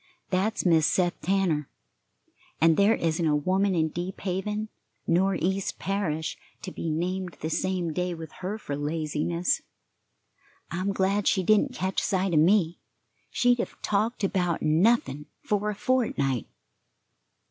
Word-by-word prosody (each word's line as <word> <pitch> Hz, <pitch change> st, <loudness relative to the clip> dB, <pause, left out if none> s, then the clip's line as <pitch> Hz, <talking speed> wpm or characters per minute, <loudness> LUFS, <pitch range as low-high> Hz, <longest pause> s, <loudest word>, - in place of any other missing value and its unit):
That's 195 Hz, +4 st, 0 dB
Mis' 160 Hz, -3 st, +4 dB
Seth 175 Hz, -2 st, 0 dB
Tanner, 180 Hz, -7 st, +1 dB, 0.9 s
and 165 Hz, 0 st, +5 dB
there 205 Hz, +5 st, +4 dB
isn't 165 Hz, 0 st, -1 dB
a 150 Hz, -, +3 dB
woman 190 Hz, +5 st, +1 dB
in 160 Hz, -1 st, +2 dB
Deep 175 Hz, +4 st, -5 dB
Haven 210 Hz, +3 st, -2 dB, 0.4 s
nor 190 Hz, +3 st, +2 dB
East 190 Hz, +3 st, -1 dB
Parish 170 Hz, -6 st, -2 dB, 0.2 s
to -, -, -5 dB
be 165 Hz, -, -4 dB
named 180 Hz, +3 st, -2 dB
the 160 Hz, -, -3 dB
same 180 Hz, -2 st, -1 dB
day 180 Hz, +1 st, -1 dB
with 160 Hz, -1 st, -8 dB
her 195 Hz, +4 st, -3 dB
for 145 Hz, -9 st, -5 dB
laziness. 155 Hz, +3 st, -1 dB, 1.1 s
I'm 185 Hz, +4 st, -1 dB
glad 195 Hz, +1 st, +1 dB
she 190 Hz, -, +3 dB
didn't 215 Hz, +7 st, +3 dB
catch 190 Hz, -4 st, -1 dB
sight 190 Hz, -2 st, 0 dB
of 155 Hz, -, +5 dB
me; 175 Hz, 0 st, +3 dB, 0.5 s
she'd 245 Hz, -1 st, +2 dB
have -, -, -4 dB
talked 215 Hz, +2 st, 0 dB
about 180 Hz, -4 st, 0 dB
nothing 155 Hz, -, +2 dB, 0.2 s
for 210 Hz, 0 st, 0 dB
a 210 Hz, -, -3 dB
fortnight." 195 Hz, -, 0 dB
185 Hz, 140 wpm, -27 LUFS, 160-200 Hz, 1.1 s, and